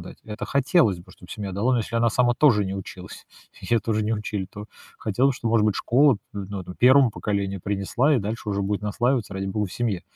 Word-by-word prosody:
дать. - - -11
Это 105 -1 -6
хотелось 135 - +2
бы, 85 - -16
чтобы 90 - -16
семья 100 -2 -5
дала, 115 +7 +1
но 120 - +2
если 115 +1 -3
она 115 0 +3
сама 120 0 +2
тоже 115 -9 +4
не 95 - -4
училась, 95 -1 -9 0.4
ее 115 -2 +1
тоже 110 0 -1
не 110 - 0
учили, 105 -2 -3
то 105 +1 -9 0.3
хотелось, 125 +6 +1
что, 115 - -3
может 110 -2 +3
быть, 105 - +2
школа, 130 -2 +3 0.2
н 100 -2 -5
ну, 100 -2 -4
1 130 0 +5
поколению 100 -3 -3
принесла, 105 +9 +1
и - - +3
дальше 105 +1 -4
уже 100 0 -1
будет 100 +1 -2
наслаиваться, 120 +2 0
ради 95 0 -4
бога, 105 +1 -1
в - - -11
семье 110 -7 -2
105 Hz, 225 wpm, -24 LUFS, 100-120 Hz, 0.4 s, 1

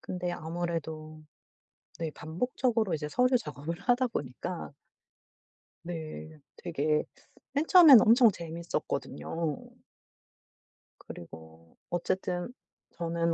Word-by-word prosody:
근데 180 -1 -4
아무래도 160 -2 -5 0.8
네 165 -2 -2
반복적으로 220 - -1
이제 150 -1 -3
서류 250 - +3
작업을 165 -3 -5
하다 245 +3 +2
보니까 165 - -5 1.1
네. 160 -2 -7 0.2
되게 155 -3 0 0.5
맨 290 +3 +1
처음에는 315 - +10
엄청 230 0 +6
재밌었거든요. 165 - -4 1.4
그리고 80 0 -12
어쨌든 180 +3 -2 0.4
저는 170 0 -1
170 Hz, 215 characters per minute, -29 LUFS, 155-200 Hz, 1.4 s, 처음에는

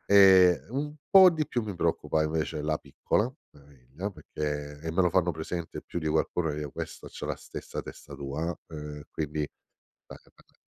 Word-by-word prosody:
Ehm, 95 -3 +7
un 145 +5 -3 0.2
po' 190 -2 +10
di 155 -3 -1
più 120 - 0
mi 105 -2 -4
preoccupa 80 -2 +1
invece 80 0 -1
la 75 0 +1
piccola, 105 - 0 0.3
mia 70 - -18
figlia, 70 +7 -7
perché 75 -5 -5
e 80 0 -3
me 95 - +3
lo 90 - +4
fanno 90 -1 +3
presente 80 +1 -5
più - - -5
di 80 -2 -2
qualcuno, 80 +1 +1
che 75 - -4
io 75 -2 -4
questa - - -7
c'ha - - -7
la - - -2
stessa - - -6
testa - - -10
tua, 75 +5 -3
uhm, 80 - -7 0.2
ehm, 75 - -8
quindi 75 -1 -3 0.7
beh, - - -10 0.2
beh. - - -25
80 Hz, 190 wpm, -29 LUFS, 75-95 Hz, 0.7 s, po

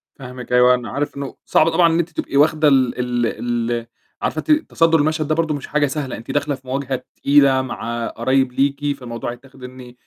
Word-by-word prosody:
فاهمِك 125 -2 -8
أيوه، 125 0 +6
أنا 125 -1 -6
عارف 145 +1 -3
إنه 140 -2 -6
صعب 155 - +3
طبعًا 170 +1 +4
إن 170 - +1
أنتِ 170 +1 -1
تبقي 145 -3 -3
واخْدة 155 +1 +4
ال 130 -3 +2
ال 120 -1 0 0.5
ال 115 -1 -3 0.3
عارفة - - -2
إن 305 - +7
أنتِ 310 - -7
تَصدُّر 165 -1 +3
المشهد 155 +1 0
ده 155 - +1
برضه 160 -2 0
مش 145 - -7
حاجة 150 -1 +1
سهلة، 135 -2 -4
أنتِ 115 - -8
داخلة 145 0 0
في 130 0 -20
مواجهة 130 -1 -3
تقيلة 140 -2 +4
مع 120 -2 -4
قرايب 130 +2 0
ليكِ، 140 +2 0
فالموضوع 120 -2 -5
هيتّاخِد 130 +2 -14
إن 125 -1 -10
135 Hz, 210 wpm, -20 LUFS, 125-150 Hz, 0.5 s, إن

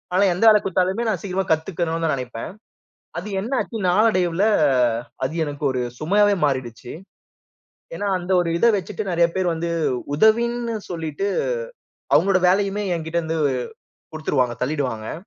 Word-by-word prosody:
ஆனா, 195 - +4
எந்த 180 - -2
வேலை 210 -1 +6
குடுத்தாலுமே 190 +4 0
நான் 190 -6 -1
சீக்கிரமா 190 -1 -2
கத்துக்கணும் 165 0 -1
தான் 155 - +1
நெனைப்பேன். 125 0 -6 0.7
அது 185 - -8
என்ன 225 +6 -6
ஆச்சு? 225 - -6
நாளடைவுல 185 -2 +2 0.8
அது 140 - -3
எனக்கு 145 0 -7
ஒரு 125 -1 -2 0.2
சுமையாவே 205 +5 +3
மாறிடுச்சு. 125 -4 -3 1.0
ஏன்னா, 205 - -3
அந்த 180 +2 -5
ஒரு 170 - -2
இத 235 - +4
வச்சிட்டு 195 +3 -5
நெறைய 170 0 +3
பேர் 185 -2 +1
வந்து 170 +1 -3 0.5
உதவின்னு 235 +4 +2
சொல்லிட்டு, 165 +2 -3 0.9
அவங்களோட 190 -1 +4
வேலையுமே 200 +2 +1
என்கிட்ட 160 +1 -2
வந்து 160 0 -2 0.8
குடுத்துருவாங்க, 125 -6 0
தள்ளீடுவாங்க. 125 -6 -3
175 Hz, 135 wpm, -22 LUFS, 155-200 Hz, 1.0 s, வேலை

